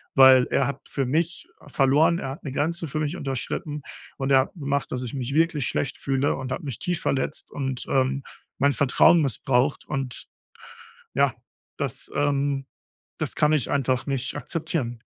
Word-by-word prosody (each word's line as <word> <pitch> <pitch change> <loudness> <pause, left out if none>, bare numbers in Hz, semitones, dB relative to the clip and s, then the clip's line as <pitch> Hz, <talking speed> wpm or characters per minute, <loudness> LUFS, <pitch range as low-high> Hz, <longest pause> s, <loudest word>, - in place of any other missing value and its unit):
weil 130 -2 +8
er 135 - +2
hat 140 - -4
für 135 - -1
mich 165 +6 -1 0.2
verloren, 145 +5 +3
er 135 - -4
hat 140 - -9
'ne 140 - -4
Grenze 165 +4 -1
für 155 +2 -3
mich 155 +4 -2
unterschritten 145 +2 -3 0.4
und 135 0 -1
er 135 - +7
hat 130 - -1
macht, 140 -3 -2
dass 125 0 -2
ich 120 - -6
mich 130 -1 -3
wirklich 160 -4 +2
schlecht 135 - -2
fühle 135 +1 0
und 130 -1 -5
hat - - -5
mich 135 -7 -5
tief 175 -2 -1
verletzt 135 -1 -2
und, 135 -3 -3
ähm, 135 +1 +1 0.4
mein 140 +1 +4
Vertrauen 140 +5 +5
missbraucht 135 +1 +1
und, 135 -4 -4 0.9
ja, - - +3 0.4
das, - - -4
ähm, 140 -1 +1 0.5
das - - -2
kann 150 +1 +3
ich 150 -7 +1
einfach 130 -3 +1
nicht 135 -2 -2
akzeptieren. 145 -5 -3
140 Hz, 170 wpm, -25 LUFS, 130-150 Hz, 0.9 s, weil